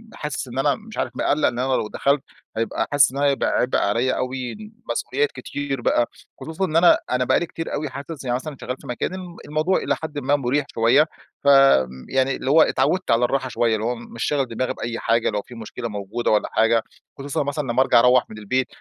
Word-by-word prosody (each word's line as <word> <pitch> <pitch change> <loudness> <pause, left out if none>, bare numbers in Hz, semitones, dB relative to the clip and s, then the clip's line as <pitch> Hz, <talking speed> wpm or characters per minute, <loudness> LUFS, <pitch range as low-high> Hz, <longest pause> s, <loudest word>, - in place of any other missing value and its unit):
حاسس 150 -2 -4
إن 130 +2 -5
أنا 145 +1 +2
مش 220 0 -12
عارف - - -1
مقلق 150 +1 +2
إن 120 - -2
أنا 130 +1 0
لو 110 - 0
دخلت، 140 +5 +1 0.4
هيبقى 115 0 -1
حاسس 145 -1 +5
إن 135 - -7
هيبقى 140 -1 +2
عبء 125 - +1
عليَّ 115 +6 +1
أوي، 130 -1 -3 0.4
مسؤوليات 140 +4 -1
كتير 135 0 -5
بقى، 120 0 +2 0.3
خصوصًا 160 +4 -2
إن 155 - -4
أنا 170 +1 +6
أنا 125 0 +2
بقى - - +3
لي - - -2
كتير 165 0 -6
أوي 150 0 -2
حاسس 140 +3 -8
يعني 125 -2 0
مثلًا، 140 +2 -5
شغال 125 - -3
في - - -13
مكان 120 +5 -2 0.3
الموضوع 155 +5 +1
إلى - - 0
حد 155 -2 -6
ما 140 +1 +2
مريح 140 +1 0
شويّة، 115 +7 +4 0.4
ف - - -28 0.6
يعني 135 0 +1
اللي 130 - -4
هوّ 160 +3 +6
اتعودت 185 +3 +1
على 115 +2 +4
الراحة 130 +1 -1
شويّة؛ - - -12 0.2
اللي 110 0 -1
هوّ 120 +1 0
مش 115 0 -7
شاغل 145 -2 +1
دماغي 125 +2 -2
بأي 115 0 -4
حاجة، 115 0 +1
لو 105 -1 -2
في 120 - -13
مشكلة 115 +1 -6
موجودة 105 +3 -2
والّا 105 - +2
حاجة، 115 0 +3 0.4
خصوصًأ 140 +1 -2
مثلًا 145 +1 -2
لمّا 130 - +3
أرجع 125 - +5
أروح 125 +1 +4
مِن 110 - -10
البيت، 125 +4 -1
130 Hz, 215 wpm, -22 LUFS, 120-145 Hz, 0.6 s, أنا